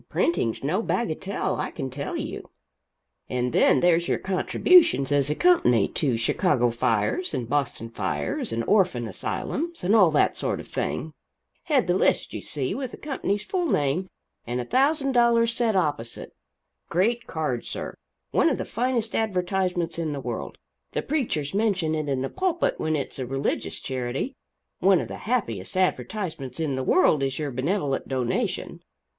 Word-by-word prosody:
Printing's 115 - 0
no 170 +10 +1
bagatelle, 190 -3 -1
I - - -2
can 135 -4 -5
tell 140 +2 -4
you. - - -6 0.8
And 125 -1 -1
then - - +4
there's 175 -1 +3
your - - +1
contributions, 195 - +4
as 145 -1 +3
a 150 - 0
company, 125 - +4
to 130 -7 0
Chicago 120 +1 +2
fires 115 - 0
and 125 -3 -3
Boston 135 -4 -1
fires, 115 - -2
and 115 0 -1
orphan 175 - +2
asylums 330 - -3
and 195 +5 +3
all 190 -6 +7
that 155 - +2
sort - - -1
of - - -9
thing 155 - -3 0.5
head 290 -7 +3
the 175 - +2
list, 185 - +1
you - - -4
see, 135 -4 -2
with 265 -1 -3
the - - -10
company's 210 -8 -2
full 360 -3 -1
name 150 - +1 0.4
and 120 +1 -2
a 125 - -3
thousand 275 - +2
dollars 235 -2 +4
set 230 -3 +1
opposite 145 -10 -2 0.6
great 230 +8 +1
card, 150 -7 -2
sir - - -5 0.4
one - - +4
of - - 0
the - - -3
finest 235 -1 -1
advertisements 180 -4 0
in 160 -3 -1
the 140 - -4
world - - -5 0.4
the - - -1
preachers 220 - -1
mention 195 -6 +1
it 155 -2 -2
in 135 -1 0
the - - -1
pulpit 360 -2 0
when 155 0 0
it's 140 -2 -4
a 130 - -3
religious 135 +2 -2
charity 130 - -3 0.5
one 190 -1 +5
of - - -4
the - - -6
happiest 115 - -1
advertisements 180 - -2
in 150 -4 -1
the 130 - -2
world 170 -2 +4
is 135 -1 -1
your 150 -2 -2
benevolent 140 +2 -1
donation. 130 -3 -2
165 Hz, 165 wpm, -25 LUFS, 135-220 Hz, 0.8 s, all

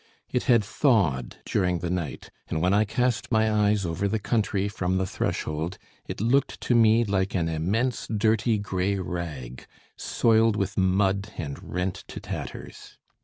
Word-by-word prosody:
It 125 - 0
had 120 -5 +5
thawed 95 - +1
during 90 -2 +1
the 85 +1 -3
night, 85 -8 -4 0.2
and 80 - -2
when 90 +4 +2
I 105 +2 +4
cast 120 +1 -1
my 110 -1 +3
eyes 105 -2 +2
over 85 +4 -1
the 110 +3 0
country 105 -2 0
from 95 -2 -1
the 95 - +1
threshold, 80 -1 -3 0.3
it - - -5
looked 125 +6 +1
to - - +1
me 115 0 +5
like 95 -3 -1
an 85 -3 +1
immense 100 +11 -1
dirty 110 +1 +2
grey 100 -1 -1
rag, 80 -9 -5 0.3
soiled 115 -1 +2
with 100 -1 -2
mud 95 +2 +1
and 70 -4 -5
rent 90 +1 -3
to - - -7
tatters. - - -8
100 Hz, 160 wpm, -26 LUFS, 90-110 Hz, 0.3 s, had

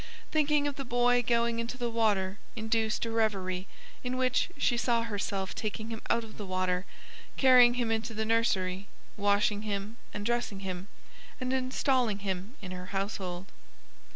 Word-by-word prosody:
Thinking 300 -1 +3
of 285 - -3
the 275 - -3
boy 245 0 +3
going 235 0 +1
into 230 +2 -3
the 240 -2 -2
water 210 -4 +1 0.2
induced 220 0 0
a 230 - -3
reverie 195 -4 0 0.4
in 250 0 -2
which 255 +3 +2
she 245 - +2
saw 235 -1 +2
herself 200 -3 -2
taking 220 +1 -4
him 225 - -5
out 230 - +2
of 220 - -11
the 205 - -4
water, 185 0 0 0.5
carrying 250 -2 +7
him 240 -2 0
into 225 0 -1
the 220 +1 -1
nursery, 200 -4 +1 0.3
washing 205 0 +2
him 210 +1 -3
and 205 - -5
dressing 235 -4 -1
him, 185 0 -4 0.5
and 255 0 -1
installing 255 -3 +1
him 190 +5 -3
in 185 - -6
her 180 0 -6
household. 195 -2 -3
220 Hz, 160 wpm, -30 LUFS, 195-240 Hz, 0.5 s, carrying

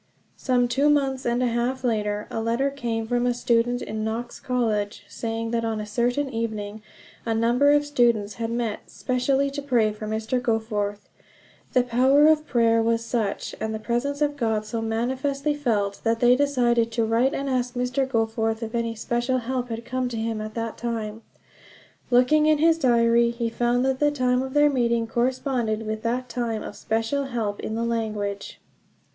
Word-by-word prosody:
Some 250 -2 +1
two 270 +5 +2
months 270 -3 +1
and 240 +1 +1
a - - +2
half 240 +2 -1
later 210 -3 -1
a 225 - -2
letter 235 +5 0
came 235 -5 -3
from 245 +1 0
a 245 - +1
student 245 0 +1
in 215 0 -4
Knox 230 +2 -4
College, 220 -6 -1
saying 225 +1 -4
that 230 -1 0
on 225 -1 -1
a 210 - -4
certain 245 +6 0
evening 215 -2 -4 0.4
a 225 -1 -1
number 240 +5 +3
of 290 0 +4
students 235 -7 +2
had 225 - -1
met 230 -2 -3
specially 270 +2 0
to 285 +1 -4
pray 235 -6 +2
for 215 0 -7
Mr. 220 +3 -1
Goforth. 215 -4 -2 0.7
The 250 - +4
power 260 +4 +4
of 310 -1 +4
prayer 230 -3 +3
was 230 0 0
such, 225 -4 -2
and 220 0 -2
the - - -4
presence 275 +6 -1
of 290 0 0
God 220 -4 0
so 225 +1 -3
manifestly 265 +6 -1
felt, 215 -9 -1
that 225 0 +1
they 245 +1 +5
decided 240 -4 +2
to 230 -1 +1
write 235 +5 +2
and 275 - -3
ask 250 -1 -1
Mr. 250 +2 0
Goforth 225 -1 0
if 225 +1 -5
any 230 -1 -1
special 240 +3 -1
help 250 0 -3
had 230 0 -5
come 255 0 -2
to 235 - -5
him 225 -1 -2
at 215 0 -7
that 230 -1 -4
time. 225 -2 -4 0.9
Looking 255 +5 +4
in 310 0 +4
his 325 +2 +3
diary, 235 -3 +4
he 235 0 -2
found 240 +2 +1
that 265 -1 0
the 295 - +4
time 255 -3 +1
of 265 +1 -5
their 295 0 +6
meeting 235 -3 +1
corresponded 240 -2 -1
with 215 0 -3
that 245 +2 -2
time 235 -3 -3
of - - -7
special 225 +7 -1
help 225 -6 -3
in 220 - -4
the 230 +1 -1
language. 210 -3 -3
235 Hz, 185 wpm, -24 LUFS, 225-255 Hz, 0.9 s, their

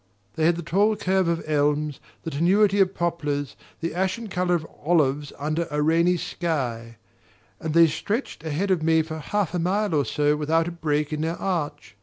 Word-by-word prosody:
They 160 - +1
had 170 - +3
the 170 - -5
tall 200 +6 +2
curve 190 -2 +1
of 170 0 0
elms, 150 -1 +1 0.2
the 165 - -4
tenuity 195 +7 +3
of 195 0 +3
poplars, 150 -5 -2 0.3
the 165 0 -2
ashen 190 +5 -2
colour 180 -1 +1
of 160 -2 -3 0.2
olives 150 -3 +1
under 155 +3 -2
a 150 - -2
rainy 170 +3 +3
sky; 120 -11 -3 0.6
and 160 -1 -3
they 170 0 +8
stretched 205 - -3
ahead 165 +6 -1
of 180 -4 +2
me 160 0 +3
for 160 0 -6
half 200 +4 -1
a 180 - 0
mile 195 +3 0
or 145 -2 +3
more 150 0 +3
without 160 +2 +1
a - - -3
break 150 -3 -1
in 150 - -2
their 165 +2 -2
arch. 145 - -3
165 Hz, 190 wpm, -24 LUFS, 150-180 Hz, 0.6 s, they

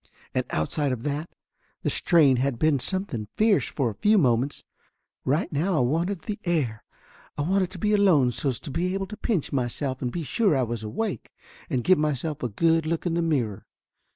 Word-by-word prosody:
And - - 0
outside 135 - -1
of 120 -2 -4
that, 150 +3 -3 0.5
the - - +1
strain 150 -7 +4
had 130 -1 0
been 155 +1 +2
something 135 - -3
fierce 215 -2 +3
for 130 -6 -1
a 105 - -15
few 210 +1 +5
moments. 130 - +1 0.6
Right 150 +6 0
now 165 +4 +1
I - - +3
wanted 165 +8 0
the 210 -2 -4
air, 145 - -1 0.5
I 145 - 0
wanted 185 +2 +1
to 185 - -9
be 210 +4 +1
alone 175 -12 +4
so's 125 +1 -1
to - - -6
be 180 +5 -1
able 195 0 -2
to 215 - -8
pinch 210 - -1
myself 130 +1 -2
and 125 - -2
be 170 - -3
sure 185 - +2
I 130 - +2
was 120 -1 -3
awake, 190 - -3 0.4
and 130 -6 0
give 185 -3 +4
myself 150 0 -1
a 125 - -1
good 165 +7 +2
look 165 +2 -2
in 175 - 0
the 170 - +1
mirror. 130 -12 -1
155 Hz, 200 wpm, -26 LUFS, 130-180 Hz, 0.6 s, few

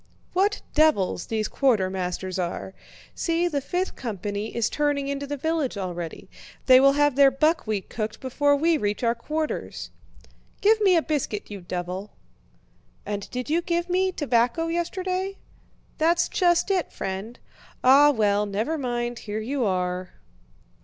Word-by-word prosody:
"What 405 +3 +1
devils 300 - +2
these 220 -1 -1
quartermasters 190 -6 0
are! 180 +2 -3 0.4
See, 335 +1 0
the 290 -5 -1
fifth 360 +7 -2
company 205 -2 -4
is 235 -1 +1
turning 290 -2 0
into 280 0 -3
the 290 +1 -3
village 310 -5 -1
already... 175 -3 -5 0.4
they 255 -1 +8
will 275 +1 +6
have 290 -1 +2
their 280 0 +7
buckwheat 265 - 0
cooked 215 -1 -4
before 285 +2 +2
we 320 +3 +2
reach 205 +3 -2
our 230 0 +3
quarters." 305 +6 -4 0.7
"Give 435 +2 +4
me 385 -3 +5
a 330 - +3
biscuit, 255 -10 -3
you 200 -2 -7
devil!" 180 +3 -5 1.0
"And 205 -1 -4
did 250 0 -4
you 325 +3 +1
give 345 0 -1
me 375 +1 +2
tobacco 270 +1 +1
yesterday? 370 +3 -2 0.6
That's 340 +2 +3
just 350 +1 +2
it, 370 -3 0
friend! 195 +5 -5 0.5
Ah, 275 +3 +7
well, 210 -5 +2
never 220 +11 -2
mind, 240 -2 -2
here 210 - -2
you 250 +3 -1
are." 180 -1 -2
265 Hz, 145 wpm, -25 LUFS, 205-320 Hz, 1.0 s, they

